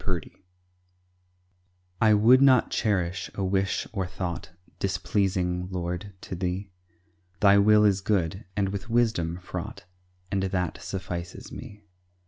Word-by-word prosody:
MY 95 Hz, -, 0 dB
REST 85 Hz, -, -4 dB, 1.7 s
I 110 Hz, -1 st, +6 dB
would 120 Hz, +5 st, +6 dB
not 130 Hz, -4 st, +5 dB
cherish 90 Hz, -4 st, 0 dB
a 100 Hz, -, -2 dB
wish 95 Hz, +1 st, 0 dB
or 95 Hz, -4 st, -1 dB
thought 90 Hz, -2 st, -5 dB, 0.3 s
Displeasing, 95 Hz, -2 st, 0 dB
Lord, 90 Hz, +2 st, -4 dB
to -, -, -7 dB
Thee; 90 Hz, +2 st, -3 dB, 0.7 s
Thy 100 Hz, -1 st, +6 dB
will 105 Hz, +1 st, +6 dB
is 100 Hz, -2 st, +3 dB
good, 95 Hz, -2 st, 0 dB
and 100 Hz, -1 st, +1 dB
with 100 Hz, +3 st, -5 dB
wisdom 110 Hz, -8 st, +1 dB
fraught, 90 Hz, -1 st, -7 dB, 0.5 s
And 100 Hz, -1 st, +1 dB
that 90 Hz, -3 st, -2 dB
suffices 90 Hz, -2 st, -6 dB
me. 105 Hz, 0 st, -10 dB
95 Hz, 125 wpm, -27 LUFS, 90-105 Hz, 1.7 s, I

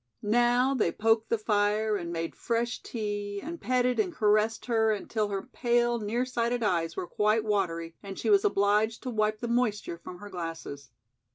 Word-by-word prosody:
Now 240 Hz, +4 st, +3 dB
they 220 Hz, -10 st, +1 dB
poked 225 Hz, +2 st, +1 dB
the 230 Hz, -, +2 dB
fire 210 Hz, 0 st, +1 dB
and 170 Hz, -4 st, -4 dB
made 165 Hz, -1 st, -3 dB
fresh 235 Hz, +1 st, -1 dB
tea 205 Hz, -2 st, -4 dB
and 330 Hz, +8 st, -7 dB
petted 250 Hz, 0 st, +1 dB
and 380 Hz, -4 st, +1 dB
caressed 215 Hz, -4 st, +2 dB
her 225 Hz, -2 st, +2 dB
until 215 Hz, +1 st, -1 dB
her 195 Hz, -1 st, -3 dB
pale, 240 Hz, -1 st, +1 dB
near 225 Hz, +4 st, -1 dB
sighted 240 Hz, -1 st, -1 dB
eyes 170 Hz, -5 st, 0 dB
were -, -, -2 dB
quite 210 Hz, +4 st, +1 dB
watery 170 Hz, -6 st, -1 dB
and 195 Hz, -1 st, -8 dB
she -, -, 0 dB
was 400 Hz, -1 st, +5 dB
obliged 215 Hz, -, +2 dB
to 255 Hz, -, -3 dB
wipe 215 Hz, -1 st, 0 dB
the 240 Hz, -, -2 dB
moisture 220 Hz, -7 st, 0 dB
from 180 Hz, -, -9 dB
her 205 Hz, +2 st, -10 dB
glasses. 165 Hz, -6 st, -6 dB
215 Hz, 180 wpm, -28 LUFS, 200-240 Hz, -, was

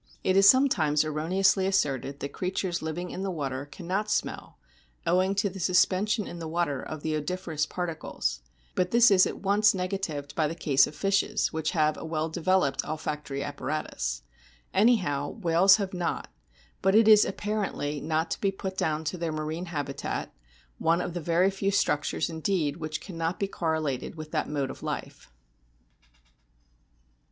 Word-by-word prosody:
It 185 Hz, -, +2 dB
is 195 Hz, 0 st, +8 dB
sometimes 165 Hz, -, +4 dB
erro 155 Hz, +1 st, -3 dB
neously 190 Hz, 0 st, +3 dB
asserted 140 Hz, -7 st, 0 dB
that 140 Hz, -, -5 dB
creatures 180 Hz, -1 st, -2 dB
living 170 Hz, +3 st, -4 dB
in 185 Hz, -, -5 dB
the 195 Hz, -, -2 dB
water 140 Hz, -5 st, -3 dB
cannot 185 Hz, +7 st, -3 dB
smell -, -, -2 dB, 0.5 s
owing 185 Hz, +3 st, +2 dB
to 200 Hz, +1 st, +1 dB
the 195 Hz, 0 st, -7 dB
suspension 190 Hz, +4 st, +2 dB
in 175 Hz, -, -8 dB
the 165 Hz, -, -5 dB
water 160 Hz, -5 st, -1 dB
of 155 Hz, -2 st, -7 dB
the 155 Hz, -1 st, -1 dB
odoriferous 155 Hz, 0 st, -2 dB
particles; 160 Hz, -, -3 dB, 0.3 s
but 180 Hz, 0 st, 0 dB
this 235 Hz, +1 st, +6 dB
is 185 Hz, -2 st, +6 dB
at -, -, -6 dB
once 205 Hz, +1 st, +4 dB
negatived 180 Hz, -6 st, -3 dB
by 155 Hz, -2 st, +1 dB
the 165 Hz, -, -4 dB
case 140 Hz, -5 st, +3 dB
of 150 Hz, -, -10 dB
fishes, 195 Hz, 0 st, +1 dB
which 160 Hz, 0 st, -1 dB
have 155 Hz, -1 st, +2 dB
a -, -, -7 dB
well 160 Hz, 0 st, -2 dB
developed 175 Hz, -3 st, +1 dB
olfactory 150 Hz, -3 st, -4 dB
apparatus. 130 Hz, -, -3 dB, 0.5 s
Anyhow, 185 Hz, -, +2 dB
whales 190 Hz, -1 st, +4 dB
have 200 Hz, -3 st, -3 dB
not; 175 Hz, -2 st, -3 dB, 0.5 s
but 190 Hz, +1 st, +3 dB
it 220 Hz, 0 st, +6 dB
is 215 Hz, -1 st, +8 dB
apparently 195 Hz, -8 st, -2 dB
not 160 Hz, +1 st, -1 dB
to -, -, -3 dB
be 195 Hz, -, +2 dB
put 190 Hz, -1 st, -6 dB
clown 155 Hz, 0 st, 0 dB
to 165 Hz, +4 st, -3 dB
their 165 Hz, -1 st, -2 dB
marine 155 Hz, +3 st, -3 dB
habitat, 145 Hz, -4 st, -4 dB, 0.5 s
one 165 Hz, +1 st, +2 dB
of 175 Hz, -, -4 dB
the 175 Hz, -, -4 dB
very 175 Hz, +4 st, +2 dB
few 195 Hz, 0 st, -1 dB
structures 150 Hz, -6 st, +1 dB
indeed 160 Hz, -2 st, -1 dB
which 155 Hz, -1 st, -4 dB
cannot 165 Hz, -1 st, -3 dB
be 200 Hz, -, 0 dB
correlated 160 Hz, -8 st, -2 dB
with 155 Hz, -1 st, -8 dB
that -, -, -1 dB
mode 140 Hz, -3 st, -2 dB
of -, -, -11 dB
life. -, -, -6 dB
170 Hz, 165 wpm, -27 LUFS, 150-190 Hz, 0.5 s, is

